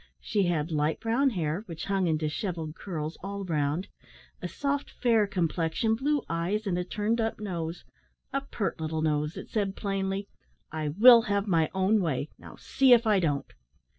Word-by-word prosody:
She 200 -4 0
had 165 -2 -1
light 150 0 0
brown 235 +5 +2
hair, 170 -5 -2
which 165 -2 -6
hung 195 -2 +1
in 160 -1 +2
dishevelled 160 +1 -3
curls 160 -3 -5
all 200 +1 -5
round, 155 +1 -1 0.5
a - - -3
soft 285 0 -2
fair 225 -5 +2
complexion, 175 +3 0
blue 285 +4 0
eyes, 175 +6 -1
and 190 -3 0
a - - -1
turned 215 +5 -1
up 225 -1 -2
nose 175 -5 -4 0.5
a 275 - 0
pert 220 -10 -3
little 160 0 -2
nose 150 0 0
that - - -9
said 200 -3 -1
plainly, 195 0 -2 0.4
"I 155 -1 -3
will 230 +10 +8
have 200 0 +1
my 165 -6 +2
own 195 +3 +3
way; 155 -3 -1
now - - -12
see 265 -2 +4
if 235 -1 +5
I 210 -3 +4
don't." 145 -5 -1
190 Hz, 175 wpm, -28 LUFS, 160-215 Hz, 0.5 s, will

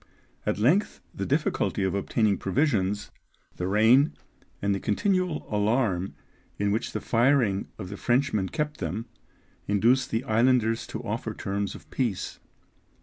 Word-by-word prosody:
At - - +1
length 145 - +2
the - - -4
difficulty - - 0
of 95 - 0
obtaining 100 +1 +1
provisions, 105 -4 0 0.5
the 90 - -2
rain, 115 +9 +4 0.4
and 100 0 +1
the 95 - -1
continual 180 - 0
alarm 105 -3 +1 0.4
in 100 0 +1
which 110 +3 -1
the - - -1
firing 115 -5 +2
of 95 -4 -7
the 100 - -6
Frenchmen 120 -6 +1
kept 150 -1 -3
them, 95 +6 -3 0.6
induced 120 +6 +3
the 115 +3 -1
islanders 115 -1 +2
to - - -6
offer - - -3
terms 100 0 -3
of - - -13
peace. 120 -8 -2
110 Hz, 140 wpm, -27 LUFS, 100-130 Hz, 0.6 s, rain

